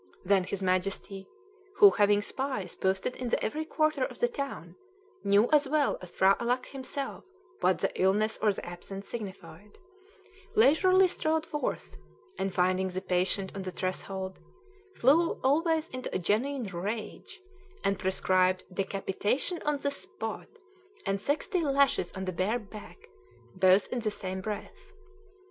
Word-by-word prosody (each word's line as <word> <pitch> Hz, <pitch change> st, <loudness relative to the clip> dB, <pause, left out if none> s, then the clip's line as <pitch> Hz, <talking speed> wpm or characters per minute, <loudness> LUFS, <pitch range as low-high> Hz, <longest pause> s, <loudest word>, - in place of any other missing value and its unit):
Then 190 Hz, -1 st, +3 dB
his 195 Hz, +1 st, -4 dB
Majesty 190 Hz, +1 st, -1 dB, 0.5 s
(who, 405 Hz, -1 st, +8 dB
having 205 Hz, -1 st, +3 dB
spies 260 Hz, -5 st, -3 dB
posted 190 Hz, +5 st, -1 dB
in 250 Hz, -2 st, -3 dB
every 305 Hz, +8 st, -2 dB
quarter 310 Hz, -3 st, +1 dB
of -, -, -4 dB
the 485 Hz, -, +2 dB
town, 270 Hz, -, -6 dB, 0.5 s
knew 200 Hz, +3 st, +4 dB
as 300 Hz, -2 st, +4 dB
well 300 Hz, -1 st, +1 dB
as 180 Hz, -1 st, -10 dB
P'hra 195 Hz, +1 st, +5 dB
Alâck 245 Hz, +2 st, 0 dB
himself 270 Hz, 0 st, -5 dB, 0.4 s
what -, -, +3 dB
the -, -, -1 dB
illness 210 Hz, +4 st, +2 dB
or 210 Hz, -1 st, +4 dB
the 195 Hz, -, -6 dB
absence 185 Hz, +3 st, -8 dB
signified) 210 Hz, -1 st, -8 dB, 0.8 s
leisurely 370 Hz, -, +5 dB
strolled 315 Hz, -2 st, 0 dB
forth, 295 Hz, -2 st, -4 dB, 0.4 s
and, 195 Hz, 0 st, -1 dB
finding 185 Hz, +1 st, +1 dB
the 185 Hz, 0 st, -3 dB
patient 190 Hz, +1 st, 0 dB
on 195 Hz, -, -5 dB
the 190 Hz, -, -4 dB
threshold, 190 Hz, +1 st, -4 dB, 0.6 s
flew 320 Hz, +7 st, +3 dB
always 320 Hz, +4 st, +2 dB
into 255 Hz, 0 st, -5 dB
a -, -, +4 dB
genuine 240 Hz, +9 st, 0 dB
rage, 210 Hz, -, -5 dB, 0.4 s
and 195 Hz, -1 st, +1 dB
prescribed 185 Hz, -1 st, +2 dB
"decapitation 200 Hz, -, -1 dB
on 300 Hz, -1 st, +1 dB
the 280 Hz, 0 st, -1 dB
spot," 385 Hz, +7 st, -5 dB, 0.6 s
and 195 Hz, -1 st, -1 dB
"sixty 310 Hz, -, 0 dB
lashes 280 Hz, -2 st, +2 dB
on 190 Hz, -1 st, -5 dB
the 185 Hz, -, -3 dB
bare 195 Hz, +7 st, 0 dB
back," 210 Hz, -5 st, -12 dB, 0.5 s
both 185 Hz, +1 st, +5 dB
in 250 Hz, -, -2 dB
the 220 Hz, -2 st, -1 dB
same 190 Hz, -2 st, -5 dB
breath. 215 Hz, -, -7 dB
205 Hz, 145 wpm, -29 LUFS, 190-280 Hz, 0.8 s, who